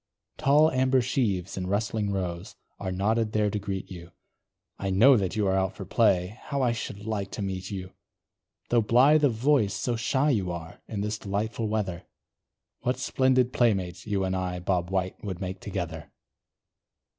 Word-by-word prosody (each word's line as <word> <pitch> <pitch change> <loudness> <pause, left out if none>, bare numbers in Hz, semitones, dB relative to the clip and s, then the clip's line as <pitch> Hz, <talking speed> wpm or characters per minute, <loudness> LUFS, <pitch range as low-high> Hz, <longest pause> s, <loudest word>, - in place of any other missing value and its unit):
Tall 150 +3 +5
amber 130 0 +3
sheaves, 105 -8 -1
in 90 -1 -3
rustling 105 +1 -1
rows, 90 -3 -4 0.2
Are 95 -2 -3
nodded 110 +4 0
there 105 -1 +2
to 105 - -2
greet 95 -2 -5
you, 85 -2 -9 0.7
I 100 - -2
know 115 +9 +6
that 95 -3 0
you 105 -2 +1
are 95 0 +2
out 95 0 0
for 95 - -7
play 100 -1 +2
How 140 -2 -1
I 120 - +3
should 105 -3 -5
like 105 -3 -2
to 105 - -3
meet 95 -1 -4
you! 95 -2 -6 0.8
Though 120 -1 +4
blithe 135 +8 +5
of 140 -5 +4
voice, 115 -5 +2
so 120 - -1
shy 135 +6 +1
you 95 -8 0
are, 85 0 -8
In 105 -2 -4
this 105 +1 -2
delightful 110 +3 -2
weather; 95 -5 -2 0.7
What 125 +1 -1
splendid 130 -1 +2
playmates, 95 -6 0
you 100 -2 0
and 95 0 -1
I, 90 -1 -2
Bob 90 -1 -1
White, 95 -1 -2
would 95 -4 -4
make 95 0 -5
together. 90 -6 -5
100 Hz, 175 wpm, -27 LUFS, 95-115 Hz, 0.8 s, know